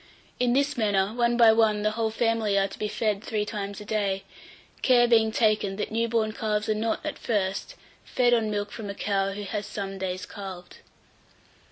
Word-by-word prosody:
In 245 Hz, -1 st, +2 dB
this 280 Hz, +1 st, +1 dB
manner 205 Hz, -2 st, +1 dB
one 240 Hz, 0 st, +1 dB
by 230 Hz, -2 st, +7 dB
one 215 Hz, -2 st, +2 dB
the 215 Hz, -, +2 dB
whole 225 Hz, 0 st, -1 dB
family 225 Hz, -2 st, +1 dB
are 195 Hz, 0 st, +3 dB
to -, -, -12 dB
be 210 Hz, -, -1 dB
fed 210 Hz, -1 st, -1 dB
three 210 Hz, -2 st, -1 dB
times 205 Hz, -1 st, -5 dB
a 210 Hz, -, -9 dB
day; 200 Hz, -2 st, -1 dB, 0.6 s
care 245 Hz, -2 st, +5 dB
being 225 Hz, -2 st, +4 dB
taken, 215 Hz, -3 st, +1 dB
that 210 Hz, -, -4 dB
new 230 Hz, +1 st, +1 dB
born 225 Hz, -2 st, 0 dB
calves 215 Hz, -1 st, -2 dB
are 215 Hz, -, +2 dB
not, 220 Hz, +1 st, -2 dB
at -, -, -4 dB
first, 205 Hz, -, -2 dB, 0.3 s
fed 245 Hz, -1 st, +2 dB
on 225 Hz, -2 st, +2 dB
milk 205 Hz, -1 st, -2 dB
from 215 Hz, -3 st, -7 dB
a 200 Hz, -, -5 dB
cow 195 Hz, -1 st, 0 dB
who 205 Hz, +1 st, -6 dB
has 205 Hz, +1 st, -4 dB
some 195 Hz, -1 st, -5 dB
days 185 Hz, -1 st, -3 dB
calved. 185 Hz, -3 st, -9 dB
215 Hz, 200 wpm, -26 LUFS, 200-230 Hz, 0.6 s, by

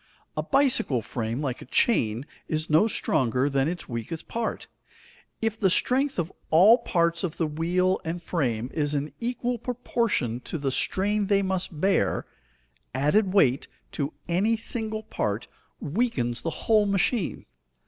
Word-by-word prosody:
A -, -, 0 dB
bicycle 260 Hz, -, +2 dB
frame, 115 Hz, +3 st, -3 dB
like 130 Hz, -3 st, -3 dB
a -, -, -9 dB
chain, 120 Hz, -, +1 dB, 0.2 s
is 155 Hz, 0 st, -2 dB
no 160 Hz, +8 st, +5 dB
stronger 130 Hz, -, +1 dB
than 135 Hz, 0 st, +2 dB
its 175 Hz, +1 st, -4 dB
weakest 120 Hz, +6 st, -5 dB
part. 230 Hz, -1 st, -3 dB, 0.8 s
If 225 Hz, 0 st, -1 dB
the 195 Hz, -, +3 dB
strength 265 Hz, +9 st, +2 dB
of 170 Hz, +1 st, -1 dB, 0.2 s
all 200 Hz, +10 st, +7 dB
parts 170 Hz, -1 st, +1 dB
of 175 Hz, -4 st, -3 dB
the 165 Hz, -, +1 dB
wheel 175 Hz, +5 st, 0 dB
and 165 Hz, +2 st, -3 dB
frame 125 Hz, -9 st, -2 dB
is 150 Hz, -1 st, 0 dB
in 145 Hz, +1 st, -2 dB
equal 245 Hz, 0 st, -2 dB
proportion 230 Hz, -, -1 dB
to 165 Hz, -, -5 dB
the 140 Hz, -3 st, -1 dB
strain 200 Hz, +8 st, +1 dB
they 200 Hz, -1 st, +3 dB
must 185 Hz, -4 st, -2 dB
bear, 195 Hz, +4 st, +1 dB, 0.7 s
added 165 Hz, +9 st, +2 dB
weight 140 Hz, -10 st, +3 dB, 0.2 s
to 145 Hz, +1 st, -3 dB
any 200 Hz, +7 st, +2 dB
single 220 Hz, -1 st, -3 dB
part 110 Hz, -, -2 dB, 0.3 s
weakens 140 Hz, -, -1 dB
the 165 Hz, -, -2 dB, 0.2 s
whole 215 Hz, -2 st, +4 dB
machine. 200 Hz, 0 st, 0 dB
170 Hz, 150 wpm, -26 LUFS, 140-215 Hz, 0.8 s, all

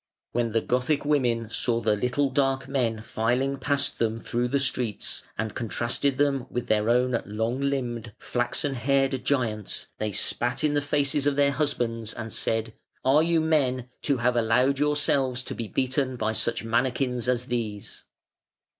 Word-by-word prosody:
When 120 Hz, -1 st, 0 dB
the 115 Hz, +1 st, +2 dB
Gothic 130 Hz, +4 st, 0 dB
women 120 Hz, -6 st, +1 dB
saw 115 Hz, 0 st, +1 dB
the 110 Hz, -2 st, +2 dB
little 125 Hz, +5 st, 0 dB
dark 135 Hz, -1 st, +1 dB
men 120 Hz, -5 st, -1 dB
filing 125 Hz, +6 st, 0 dB
past 140 Hz, +1 st, 0 dB
them 115 Hz, 0 st, 0 dB
through 120 Hz, +1 st, -1 dB
the 140 Hz, -, +1 dB
streets, 125 Hz, -5 st, -1 dB, 0.2 s
and 110 Hz, 0 st, -2 dB
contrasted 120 Hz, +5 st, 0 dB
them 140 Hz, -3 st, +1 dB
with 125 Hz, -, -3 dB
their 110 Hz, +1 st, +1 dB
own 125 Hz, 0 st, +2 dB
long 110 Hz, +5 st, -2 dB
limbed, 120 Hz, -5 st, -2 dB
flaxen 125 Hz, +4 st, -1 dB
haired 135 Hz, +1 st, +1 dB
giants, 115 Hz, -7 st, -1 dB
they 110 Hz, 0 st, -1 dB
spat 120 Hz, +5 st, 0 dB
in 150 Hz, -1 st, +2 dB
the 145 Hz, -, +2 dB
faces 145 Hz, 0 st, +1 dB
of 145 Hz, -, +2 dB
their 140 Hz, 0 st, +3 dB
husbands, 120 Hz, -6 st, -1 dB
and 115 Hz, -1 st, -6 dB
said: 110 Hz, 0 st, -1 dB, 0.3 s
"Are 140 Hz, +4 st, +5 dB
you 165 Hz, 0 st, +2 dB
men, 130 Hz, -6 st, +1 dB
to 140 Hz, -3 st, +1 dB
have 120 Hz, +1 st, +1 dB
allowed 125 Hz, +4 st, +3 dB
yourselves 140 Hz, -4 st, +2 dB
to -, -, -5 dB
be 115 Hz, -, -5 dB
beaten 130 Hz, +4 st, 0 dB
by 110 Hz, -2 st, -1 dB
such -, -, 0 dB
manikins 125 Hz, +1 st, 0 dB
as 125 Hz, -1 st, +1 dB
these?" 110 Hz, -5 st, -4 dB
125 Hz, 165 wpm, -26 LUFS, 115-140 Hz, 0.3 s, Are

